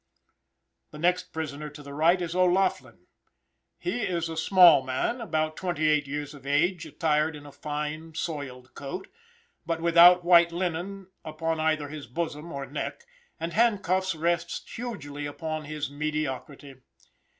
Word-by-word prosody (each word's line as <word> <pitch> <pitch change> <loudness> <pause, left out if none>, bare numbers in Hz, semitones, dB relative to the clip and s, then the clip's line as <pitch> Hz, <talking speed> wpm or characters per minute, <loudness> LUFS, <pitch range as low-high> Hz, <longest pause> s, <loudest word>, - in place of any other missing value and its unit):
The 150 - -11
next 180 +3 +1
prisoner 150 -1 -5
to 145 0 -12
the 140 0 -9
right 165 +5 +3
is 170 -2 -3
O'Laughlin. 185 +1 +1 0.7
He 295 -9 -3
is 170 -5 -1
a 160 - -5
small 175 -1 +7
man, 130 - -1
about 155 -7 -1
twenty 175 -4 -1
eight 150 -1 +2
years 145 +1 -4
of 140 -2 -12
age, 165 +5 +1
attired 155 -1 +1
in 145 -1 -11
a 145 - -10
fine, 150 +2 -5
soiled 130 -7 -5
coat, 145 +7 -7 0.5
but 165 -1 -2
without 170 +1 +7
white 170 -1 +6
linen 185 +2 -4
upon 160 +1 -2
either 155 -2 +1
his 150 -3 -8
bosom 155 +4 -4
or 140 -1 -4
neck, - - -5 0.3
and 165 +1 -4
handcuffs 190 -5 +2
rest 170 +2 -1
hugely 145 -12 -5
upon 155 +1 -5
his 150 -1 -4
mediocrity. 145 -2 -4
160 Hz, 145 wpm, -27 LUFS, 145-175 Hz, 0.7 s, small